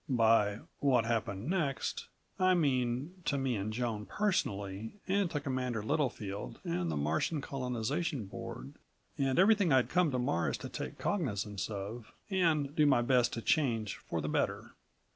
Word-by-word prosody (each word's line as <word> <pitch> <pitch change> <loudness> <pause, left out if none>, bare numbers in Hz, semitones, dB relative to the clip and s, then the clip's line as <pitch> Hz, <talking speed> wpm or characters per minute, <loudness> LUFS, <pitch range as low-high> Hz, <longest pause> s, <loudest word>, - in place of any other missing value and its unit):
By 110 -4 +3 0.2
"what 125 -5 +3
happened 115 -2 -1
next" 160 -7 -1 0.3
I 185 0 +5
mean... 140 +3 0
to 140 - +1
me 135 -3 0
and 105 +1 -2
Joan 110 -2 -2
personally 100 - -1
and 195 -1 +2
to 150 - -1
Commander 130 -5 -2
Littlefield 105 - -2
and 85 0 -1
the 75 - -1
Martian 80 - 0
Colonization 135 - -2
Board 70 -7 -7 0.5
and 135 -1 +1
everything 200 -2 +5
I'd 130 -2 +4
come 180 -3 +3
to 130 - -1
Mars 85 -9 0
to - - -7
take - - -5
cognizance 105 - -2
of, 110 +3 -6 0.2
and 160 -6 +2
do 150 -2 +5
my 120 -4 +4
best 125 -1 +3
to 115 - -4
change 115 - +1
for - - -4
the - - -3
better. - - -1
125 Hz, 155 wpm, -32 LUFS, 105-150 Hz, 0.5 s, I